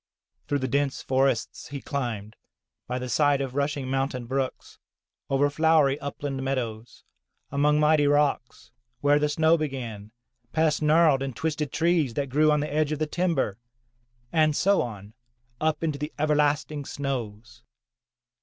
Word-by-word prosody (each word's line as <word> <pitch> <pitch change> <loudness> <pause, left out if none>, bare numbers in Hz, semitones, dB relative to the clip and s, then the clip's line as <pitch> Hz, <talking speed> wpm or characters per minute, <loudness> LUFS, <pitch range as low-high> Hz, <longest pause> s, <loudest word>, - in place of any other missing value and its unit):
Through 145 - +1
the 130 -1 -2
dense 140 +1 -1
forests 130 -3 0
he 140 - -6
climbed, 115 -7 -4 0.5
by 125 - -2
the 125 0 -4
side 145 +2 +2
of 135 -2 -3
rushing 140 -1 -1
mountain 135 -1 -2
brooks, 130 +1 -4 0.5
over 135 +1 +3
flowery 150 -2 +3
upland 140 -1 -4
meadows, 120 -4 -4 0.5
among 150 +2 +2
mighty 150 -1 +4
rocks, 145 -4 0 0.3
where 145 +1 +4
the 150 0 +1
snow 160 +2 +3
began, 120 -8 -5 0.4
past 155 -2 +2
gnarled 155 -2 +4
and 135 -3 -4
twisted 150 -1 -2
trees 160 -7 +1
that 140 -2 -2
grew 150 +4 +3
on 150 -1 +2
the 150 -1 -4
edge 155 0 +1
of 155 - -1
the 155 - 0
timber, 150 - -1 0.7
and 155 -2 +3
so 200 +4 +3
on 105 -3 -7 0.5
up 155 +1 0
into 150 -3 -1
the 150 +2 -4
everlasting 150 0 +1
snows. 120 -4 -5
145 Hz, 145 wpm, -26 LUFS, 130-150 Hz, 0.7 s, mighty